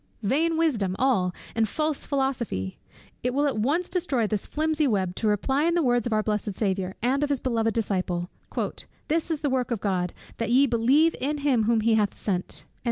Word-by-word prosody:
'" - - -31
"Vain 325 +3 +2
wisdom 225 - +1
all, 235 -9 +2 0.2
and 225 -2 +1
false 305 +2 -1
philosophy!" 245 - -2 0.4
It 250 +1 -1
will 290 +1 +2
at 270 -7 0
once 295 +11 +1
destroy 310 -11 0
this 210 -1 -2
flimsy 310 -1 +1
web, 190 -6 0
to 220 - 0
reply 265 +8 +1
in 340 0 +2
the 340 - +2
words 245 -3 +2
of - - -4
our 215 0 +2
blessed 210 -2 -2
Saviour, 190 -2 -1
and 265 +3 +2
of 295 - +1
his 280 -3 +1
beloved 225 -4 0
Disciple 185 -5 -1 0.8
"This 325 +2 +1
is 315 -3 -1
the 290 - +1
work 255 -1 0
of 235 -4 -1
God, 185 -3 -1 0.3
that 230 - -1
ye 260 +4 +5
believe 270 +7 +3
in 295 +3 0
him 270 -6 +2
whom 230 0 +3
he 225 +1 +3
hath 210 -2 +1
sent." 185 -3 -3
240 Hz, 205 wpm, -26 LUFS, 210-285 Hz, 0.8 s, ye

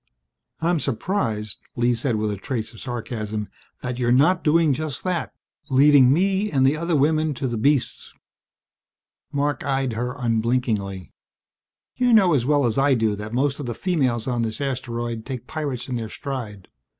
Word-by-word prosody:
"I'm 170 0 +2
surprised," 115 - -2 0.2
Lee 120 0 +2
said 120 0 -1
with 105 0 -1
a - - -2
trace 110 +3 -4
of 110 - -12
sarcasm, 110 -4 -4 0.3
"that 125 0 -3
you're 120 -1 +1
not 160 +9 +4
doing 160 -1 +4
just 150 -1 -4
that, 180 -2 -2 0.4
leaving 135 -1 +6
me 195 +6 +2
and 135 -5 +2
the 135 +3 +4
other 170 +1 -1
women 155 +1 +2
to 130 - -2
the 120 - -2
beasts!" 135 +4 0 1.2
Marc 145 -2 -1
eyed 135 -2 0
her 125 +3 -3
unblinkingly. 115 -5 -1 0.8
"You 250 -1 +2
know 190 -6 +6
as 130 -4 +1
well 145 -2 +3
as 115 +1 +1
I 140 -1 +4
do 110 -3 +1
that 105 +1 -7
most 135 +4 0
of 140 - -5
the 120 - -3
females 130 - 0
on 120 -2 0
this 110 -1 -3
asteroid 120 -4 -3
take 125 -1 -6
pirates 145 -5 -4
in 125 -2 -2
their 110 -2 -5
stride. 110 -8 -6
130 Hz, 170 wpm, -23 LUFS, 115-145 Hz, 1.2 s, leaving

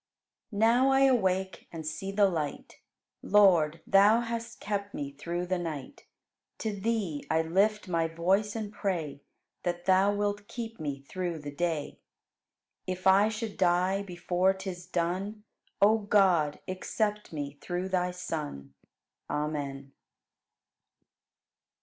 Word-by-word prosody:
1. 205 - -7
Now 240 +4 +5
I 270 0 +4
awake 190 -8 +2
and 160 -2 -7
see 195 +5 -4
the 200 0 +4
light; 155 -6 -4 0.4
Lord, 170 -6 +4
Thou 205 +4 +5
hast 235 0 -5
kept 205 -1 -3
me 140 -1 -4
through 170 +5 -4
the 185 0 -1
night. 155 -6 -6 0.5
To 220 - -2
Thee 200 -7 -2
I 160 0 +2
lift 200 +6 +1
my 165 -2 +1
voice 190 +6 +1
and 215 -2 -4
pray 165 -8 -3 0.4
That 175 0 -3
Thou 190 +1 +4
wilt 205 0 -2
keep 230 -2 -6
me 140 -3 -4
through 175 +3 -4
the 145 -1 -7
day. 160 -1 -2 0.9
If 185 0 -4
I 195 +3 +6
should 220 -1 -5
die 185 +2 +2
before 180 0 0
'tis 185 -2 -7
done, 185 +5 -2 0.4
O 220 +2 +6
God, 190 -8 +3
accept 210 +3 -2
me 145 -2 -5
through 180 +1 -3
Thy 180 -1 +1
Son! 150 - -5 0.6
Amen. 140 -2 -3
185 Hz, 130 wpm, -29 LUFS, 165-205 Hz, 0.9 s, I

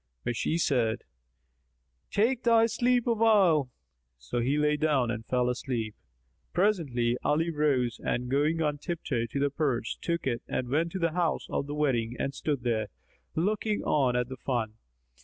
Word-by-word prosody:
But 120 0 -2
she 160 - 0
said, 120 -9 +1 1.1
"Take 230 +4 +1
thy 230 -1 +5
sleep 245 +1 +1
awhile." 210 - +4 0.5
So 60 - -4
he 130 +5 +1
lay 150 0 +3
down 145 -6 +1
and 115 -2 -4
fell 125 -1 +1
asleep. 120 -3 -2 0.6
Presently, 145 - +1
Ali 165 +3 +1
rose 140 -6 +1
and 125 +1 -1
going 150 +5 +1
on 150 -1 -1
tiptoe 135 -8 -2
to 130 +5 -3
the 140 0 +1
purse, 135 -6 -1
took 170 -1 -2
it 120 -3 -1
and 125 - -2
went 160 +5 +1
to - - -2
the 165 -2 +1
house 170 -1 0
of 140 - -1
the 145 - -4
wedding 125 -6 0
and 135 - -2
stood 140 -3 -2
there, 110 -3 0 0.5
looking 210 +5 0
on 130 -5 +2
at 125 -1 +1
the 130 0 -7
fun. 120 -4 -2
145 Hz, 165 wpm, -28 LUFS, 125-170 Hz, 1.1 s, thy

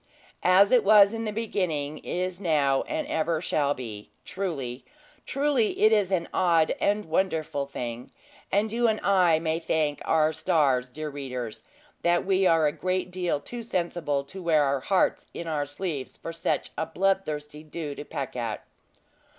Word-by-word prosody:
"As 190 +2 +5
it 250 -3 +5
was 205 0 +7
in 225 0 -3
the 215 - -2
beginning, 170 -9 -2
is 185 +1 -3
now, 145 -6 +2
and 310 -1 -2
ever 160 - 0
shall 145 -3 0
be," 110 -5 -8 0.2
truly, 160 -10 -4 0.4
truly 275 -5 +1
it 215 +1 +5
is 205 -4 +3
an 180 -3 0
odd 165 -3 +3
and 205 +1 +1
wonderful 160 -4 -1
thing. 120 -3 -6 0.4
And 205 +2 +1
you 240 0 +2
and 220 -1 +1
I 180 -5 +4
may 160 0 -1
thank 155 -3 -1
our 155 -1 +2
stars, 140 -8 +2
dear 150 +3 -6
readers, 125 -5 -6 0.4
that 175 0 +2
we 190 0 +3
are 165 -1 +4
a 150 - +3
great 185 +2 -2
deal 180 -4 -1
too 240 +10 -7
sensible 170 -9 -1
to 185 +7 -8
wear 160 -4 +3
our 140 -1 +1
hearts 190 +7 +1
in 170 - -5
our 150 -3 -2
sleeves 145 -2 -5
for 165 - -7
such 165 - -1
a 160 - -1
bloodthirsty 155 -5 -1
dew 155 -1 -6
to 145 - -7
peck 135 -3 -5
at. 115 -3 -4
165 Hz, 165 wpm, -27 LUFS, 145-190 Hz, 0.4 s, was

